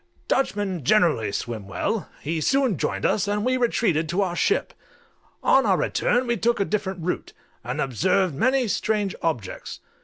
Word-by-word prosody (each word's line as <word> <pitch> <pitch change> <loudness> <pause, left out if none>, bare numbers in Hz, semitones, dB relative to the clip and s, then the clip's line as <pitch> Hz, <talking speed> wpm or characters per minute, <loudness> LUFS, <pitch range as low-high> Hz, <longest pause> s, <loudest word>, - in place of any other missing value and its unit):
Dutchmen 205 - 0
generally 150 - +3
swim 110 -2 -4
well: 200 - -2
he 160 +2 -2
soon 265 - +2
joined 100 -7 -2
us, 205 -1 +1
and 205 +1 -1
we 255 0 +2
retreated 210 -10 +1
to 185 +4 +1
our 175 -2 -2
ship. 420 - +1 0.7
On - - +5
our - - +3
return 245 +1 +1
we 235 -1 0
took 235 +3 +1
a 200 - +2
different 190 -4 -3
route, 180 - -3 0.3
and - - -4
observed 180 - +1
many 255 - +2
strange 210 -1 0
objects. 125 - -3
195 Hz, 160 wpm, -24 LUFS, 160-225 Hz, 0.7 s, On